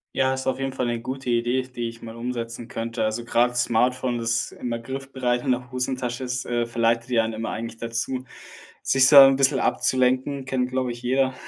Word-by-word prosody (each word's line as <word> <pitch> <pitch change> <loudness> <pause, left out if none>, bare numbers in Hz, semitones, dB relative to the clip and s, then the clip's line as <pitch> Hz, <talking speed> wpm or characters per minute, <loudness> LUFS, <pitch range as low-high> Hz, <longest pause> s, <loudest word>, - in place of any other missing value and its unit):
Ja, 130 0 +2
ist 130 0 -4
auf 130 0 -1
jeden 135 -1 -2
Fall 130 -2 -1
'ne 120 -1 -1
gute 130 +1 -5
Idee, 120 +2 +1
die 125 -2 -5
ich 115 0 -9
mal 115 0 -9
umsetzen 115 -1 -5
könnte. 115 -1 -3
Also, 110 +2 -2
grad 120 +1 +1
's 125 - +3
Smartphone, 125 +1 +1
das 115 -1 -1
immer 120 -1 -4
griffbereit 130 0 -3
in 130 - 0
der 125 0 -2
Hosentasche 125 -1 -2
ist, 125 +1 -3
äh, 120 -1 0
verleitet 115 0 0
ja 115 -2 +3
einen 110 - -2
immer 110 +1 -4
eigentlich 115 +1 -5
dazu, 120 +3 -3 0.6
sich 130 -1 +4
so 145 - +5
ein 135 -1 +10
bisschen 135 0 +3
abzulenken, 130 +2 +1
kennt, 130 -1 -1
glaube 130 -1 -1
ich, 120 0 -8
jeder 130 +1 +1
125 Hz, 210 wpm, -24 LUFS, 115-130 Hz, 0.6 s, ein